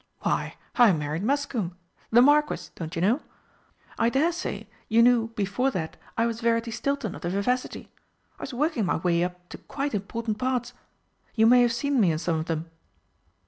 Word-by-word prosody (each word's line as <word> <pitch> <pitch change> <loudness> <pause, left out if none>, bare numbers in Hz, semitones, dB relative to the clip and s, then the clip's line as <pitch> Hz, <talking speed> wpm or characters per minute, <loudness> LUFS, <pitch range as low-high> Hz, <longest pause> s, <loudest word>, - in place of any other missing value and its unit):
"Why, - - -1 0.2
I 240 -6 +7
married 150 +1 -2
Muscombe 230 -7 -1 0.3
the 240 +2 +6
Marquis, 295 +2 +2
don't 165 -1 -7
you 165 - -1
know. 235 +10 +2 0.8
I 230 - +3
dare 285 +7 +2
say 350 +2 -5 0.2
you 230 +1 +5
knew 240 -2 +4
before 205 +6 0
that 165 -10 -4 0.2
I 230 - +3
was 230 0 -3
Verity 230 0 +1
Stilton 280 -3 -2
of - - -10
the 175 - -2
Vivacity. 200 +7 -2 0.5
I - - -11
was - - -5
working 255 - 0
my - - +1
way 170 0 +1
up 180 0 -5
to - - -9
quite 280 -1 -4
important 215 +2 -3
parts. 250 -1 -1 0.6
You 220 -1 +4
may 245 +2 +7
have 240 -1 +3
seen 280 +3 0
me 180 -5 +4
in 155 - -1
some 165 0 -1
of 155 - -3
them?" 165 0 -3
230 Hz, 185 wpm, -26 LUFS, 180-255 Hz, 0.8 s, I